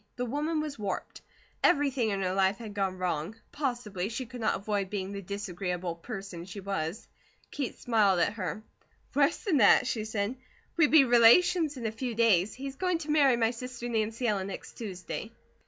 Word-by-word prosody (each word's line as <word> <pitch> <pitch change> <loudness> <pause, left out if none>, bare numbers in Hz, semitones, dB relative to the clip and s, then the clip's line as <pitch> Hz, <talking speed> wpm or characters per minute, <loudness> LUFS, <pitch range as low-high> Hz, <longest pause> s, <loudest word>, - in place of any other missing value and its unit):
The 250 - -2
woman 300 +5 -1
was 300 -5 -5
warped. 200 -2 -4 0.4
Everything 275 -8 +3
in 195 -1 -1
her 185 0 0
life 195 +1 +2
had 220 -3 -8
gone 195 -2 -1
wrong. 180 +1 -2 0.2
Possibly 240 -9 -3
she 255 +3 -4
could 245 +1 -9
not 220 - +2
avoid 200 -1 -2
being 195 -1 -3
the 200 0 -5
disagreeable 180 -2 -4
person 195 -1 -7
she 195 +2 -8
was. 195 -1 -4 0.4
Kate 275 -4 -4
smiled 210 -6 +3
at 200 - +2
her. 210 -1 -4 0.5
"Worse 285 +1 +3
than 370 -9 +2
that," 210 -1 +6
she 230 -4 -1
said. 215 +3 -2 0.4
"We 325 -3 +5
be 290 -3 +6
relations 295 +7 +5
in 240 - -6
a 220 - 0
few 235 +1 -4
days. 210 -4 +3
He's 270 0 -7
going 365 -2 +1
to 300 - -2
marry 280 -5 +5
my 225 -1 +2
sister 245 0 -6
Nancy 225 +1 -1
Ellen 195 -3 0
next 195 - -8
Tuesday." 205 +1 -6
220 Hz, 185 wpm, -29 LUFS, 195-255 Hz, 0.5 s, that